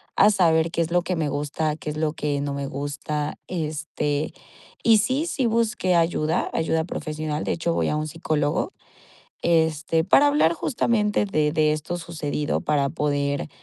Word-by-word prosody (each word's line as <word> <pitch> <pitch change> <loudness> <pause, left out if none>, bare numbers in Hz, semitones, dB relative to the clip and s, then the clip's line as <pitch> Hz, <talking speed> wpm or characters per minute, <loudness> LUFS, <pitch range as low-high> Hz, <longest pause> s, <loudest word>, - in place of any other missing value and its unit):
a 210 +2 +6
saber 165 -4 +3
qué 170 - 0
es 165 - -2
lo 175 0 +2
que 180 - -1
me 155 -3 -1
gusta, 150 +2 -1
qué 150 - -6
es 150 - -6
lo 155 -1 0
que 145 -2 -2
no 140 0 -2
me 140 0 -3
gusta. 145 +2 -3
Este, 150 -3 -2 0.5
y 225 -1 +6
sí, 260 +9 0
sí 270 -7 -1
busqué 225 -5 +1
ayuda, 165 -1 +1
ayuda 160 0 +1
profesional, 155 -2 -4
de - - -1
hecho, 165 0 -1
voy - - 0
a - - 0
un 155 0 -2
psicólogo, 155 - -1 0.7
este, 160 -1 +2
para 275 - +5
hablar 285 - +3
justamente 210 0 +1
de 155 -6 +1
de 155 -1 +3
esto 155 +3 -4
sucedido, 155 -3 -2
para 145 -2 +1
poder, 145 0 -1
160 Hz, 170 wpm, -24 LUFS, 150-175 Hz, 0.7 s, a